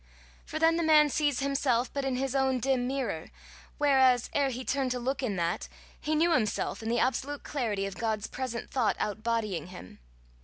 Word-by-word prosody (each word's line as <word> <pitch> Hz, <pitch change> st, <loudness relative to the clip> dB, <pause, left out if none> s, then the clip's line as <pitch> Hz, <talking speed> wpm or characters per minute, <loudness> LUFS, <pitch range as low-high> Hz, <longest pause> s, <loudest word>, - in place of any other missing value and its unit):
For -, -, -4 dB
then 325 Hz, +1 st, +4 dB
the 340 Hz, -, 0 dB
man 305 Hz, -2 st, +6 dB
sees 290 Hz, -2 st, +1 dB
himself 270 Hz, -3 st, +1 dB
but 280 Hz, -, -2 dB
in 270 Hz, -1 st, -1 dB
his 265 Hz, 0 st, -1 dB
own 265 Hz, -1 st, +2 dB
dim 255 Hz, 0 st, +1 dB
mirror, 250 Hz, -12 st, -3 dB, 0.5 s
whereas 265 Hz, -4 st, +4 dB
ere 280 Hz, -1 st, +2 dB
he 255 Hz, 0 st, -5 dB
turned 270 Hz, -1 st, 0 dB
to 250 Hz, 0 st, -2 dB
look 265 Hz, +4 st, -2 dB
in 230 Hz, -7 st, -1 dB
that, 170 Hz, -1 st, -1 dB, 0.3 s
he 310 Hz, +1 st, -1 dB
knew 335 Hz, +3 st, +3 dB
himself 220 Hz, -6 st, 0 dB
in 220 Hz, -, -4 dB
the 240 Hz, -, +1 dB
absolute 275 Hz, +2 st, -1 dB
clarity 220 Hz, -9 st, -2 dB
of 195 Hz, -, -4 dB
God's 220 Hz, -2 st, -1 dB
present 250 Hz, -2 st, -5 dB
thought 250 Hz, -5 st, +1 dB
out 210 Hz, +1 st, -3 dB
bodying 215 Hz, -7 st, -1 dB
him. 180 Hz, -, -11 dB
255 Hz, 195 wpm, -29 LUFS, 225-280 Hz, 0.5 s, man